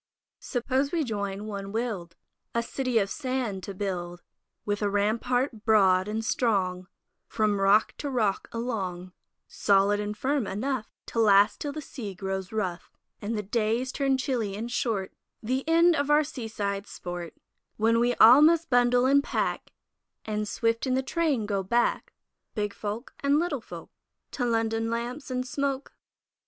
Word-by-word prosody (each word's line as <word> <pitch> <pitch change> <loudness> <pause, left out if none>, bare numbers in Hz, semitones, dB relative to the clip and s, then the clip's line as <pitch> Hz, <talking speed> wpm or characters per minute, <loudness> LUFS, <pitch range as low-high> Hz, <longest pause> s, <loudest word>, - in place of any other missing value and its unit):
Suppose 265 +2 -1
we 335 -2 +1
join, 205 -4 -3
one 200 -2 -5
will'd, 210 -7 -3 0.4
A 235 - +1
City 255 0 -1
of 200 -3 +3
Sand 255 -5 -3
to 200 - -7
build, 175 -3 -4 0.4
With 205 0 -1
a 205 - +1
rampart 225 +3 0
broad 190 -4 +4
and 220 +1 -3
strong 185 -7 0 0.4
From 210 -3 0
rock 200 +2 +4
to 290 - -3
rock 220 -7 0
along, 190 -7 -4 0.4
Solid 200 +1 +2
and 210 0 -4
firm 270 -3 0
enough 230 +3 -2 0.2
To 230 - -3
last 205 -1 +5
till 290 - -2
the 305 +1 -6
sea 215 -9 -7
grows 190 0 -4
rough 185 -5 -3 0.3
And 215 +2 -2
the 210 - -2
days 230 +5 0
turn 270 -1 +1
chilly 240 -7 -2
and 230 +3 -5
short, 210 -6 -1 0.3
The 260 +4 -1
end 335 +1 +5
of 285 -1 -1
our 295 +1 +5
seaside 215 -8 -4
sport, 175 -2 -7 0.4
When 230 +2 +2
all 245 +6 +9
must 330 0 +4
bundle 245 0 +4
and 280 +2 +4
pack - - -2 0.5
And 210 -1 -2
swift 230 +4 0
in 255 - +1
the 265 - 0
train 285 -5 0
go 200 -2 -1
back, 235 +6 0 0.4
Big 210 -2 -2
folk 215 +4 -5
and 280 +1 +2
little 310 -5 -1
folk, - - -10 0.4
To 245 - -2
London 225 -1 0
lamps 240 +5 -4
and 255 0 -2
smoke? 275 0 -2
225 Hz, 155 wpm, -27 LUFS, 200-260 Hz, 0.5 s, all